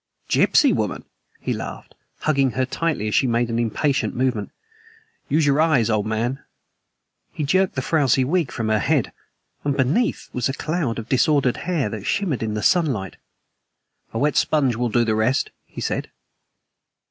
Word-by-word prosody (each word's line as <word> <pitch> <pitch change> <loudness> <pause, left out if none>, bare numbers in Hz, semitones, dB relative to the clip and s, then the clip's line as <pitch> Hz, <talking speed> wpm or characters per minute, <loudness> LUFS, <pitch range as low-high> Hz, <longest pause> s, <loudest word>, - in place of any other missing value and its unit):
"Gypsy - - +4
woman!" - - -2 0.3
he - - -2
laughed, - - -7 0.3
hugging 135 -5 +2
her 130 0 0
tightly 145 -5 -2
as 105 - -2
she 135 - +3
made 120 0 +1
an 115 - 0
impatient 135 +5 0
movement. 125 -5 -1 0.8
"Use 155 +1 +3
your 145 +1 +3
eyes, 135 -9 +3
old 105 -1 0
man." 115 +5 -1 0.9
He 155 - -4
jerked 185 +6 +2
the 130 - -2
frowsy 140 -4 +2
wig 160 +1 0
from 110 -1 -2
her 110 -1 +2
head, - - +1 0.5
and 140 -1 -1
beneath 145 - +1
was 125 +1 0
a - - -1
cloud 155 -5 -2
of 115 - -6
disordered 135 -1 +2
hair 160 -10 +1
that 105 -1 -6
shimmered 180 -11 0
in 110 -1 -2
the 105 - -3
sunlight. 130 - +1 0.9
"A - - -4
wet 145 +5 +1
sponge 135 -6 +2
will 120 +1 -1
do 120 +2 +2
the 110 - +1
rest," 110 +5 +1 0.2
he - - -10
said. - - -2
130 Hz, 170 wpm, -22 LUFS, 115-150 Hz, 0.9 s, Gypsy